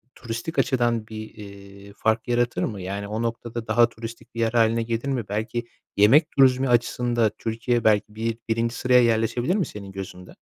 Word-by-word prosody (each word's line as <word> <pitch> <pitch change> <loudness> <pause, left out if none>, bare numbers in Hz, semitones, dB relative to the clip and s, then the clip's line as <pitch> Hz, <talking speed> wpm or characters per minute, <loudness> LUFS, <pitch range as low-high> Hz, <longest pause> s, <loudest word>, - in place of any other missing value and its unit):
turistik 115 +7 -4
açıdan 120 -4 +1
bir, 110 0 -8
eee, 100 -1 -12
fark 110 0 0
yaratır 120 0 0
mı? 100 -4 -3
Yani, 100 +2 -4
o 110 +2 -3
noktada 115 0 -4
daha 115 +2 +4
turistik 115 0 -10
bir - - -5
yer 115 -1 +1
hâline 115 0 +3
gelir 115 +3 -3
mi? 130 -4 -1
Belki 110 +3 -3 0.3
yemek 110 +10 +5
turizmi 130 -1 +4
açısında 120 -1 +2
Türkiye 115 +1 -1
belki 105 -1 +2
bi 115 +1 -2
birinci 115 +1 0
sıraya 125 -1 +4
yerleşebilir 120 - +1
mi 195 - +1
senin 100 -2 -9
gözünde? 95 -1 -9
115 Hz, 170 wpm, -24 LUFS, 110-120 Hz, 0.3 s, yemek